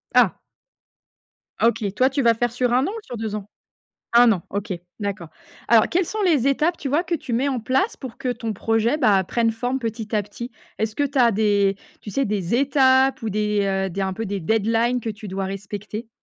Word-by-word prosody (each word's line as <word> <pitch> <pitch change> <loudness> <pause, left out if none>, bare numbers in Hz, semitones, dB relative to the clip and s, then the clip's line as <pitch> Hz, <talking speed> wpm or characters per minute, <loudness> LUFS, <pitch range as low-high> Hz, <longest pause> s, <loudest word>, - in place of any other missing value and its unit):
Ah! - - +5 1.3
OK, 230 -2 +2
toi 255 +3 +4
tu 275 +1 -1
vas 235 -2 +5
faire 240 +1 -1
sur 245 0 0
1 255 +2 +3
an - - -1
ou 450 - -6
sur 245 -8 -7
2 220 -1 -3
ans? 205 -2 -6 0.7
1 240 0 +7
an. 190 -5 0
OK, 200 0 -3 0.3
d'accord. 200 -5 -4 0.4
Alors 230 -2 +5
quelles 360 +1 +1
sont 430 +5 -3
les 300 -9 +3
étapes 310 +5 +1
tu 275 - -4
vois 305 +6 +2
que 355 - -3
tu 315 - -3
mets 245 +4 +1
en 265 -3 -1
place 260 - 0
pour 255 -4 -9
que 255 - -3
ton 230 -2 -4
projet, 225 +6 +1
bah, 210 -9 +4
prenne 230 +4 +1
forme 245 +3 -2
petit 225 -2 -5
à 210 - +1
petit? 235 +5 -8 0.3
Est-ce 220 0 -1
que 290 - +1
tu 285 0 -2
as 240 - +6
des, 200 -2 +2 0.2
tu - - -8
sais, 275 +7 0
des 200 -1 -1
étapes 265 -1 +3
ou 225 - -2
des, 210 0 0
heu, 195 0 0
des 195 - -3
un 190 0 -1
peu 225 +4 -4
des 200 -1 -3
deadlines 225 +6 +1
que 230 - -4
tu 210 0 -10
dois 195 0 -3
respecter? 205 +3 -6
230 Hz, 220 wpm, -22 LUFS, 205-260 Hz, 1.3 s, 1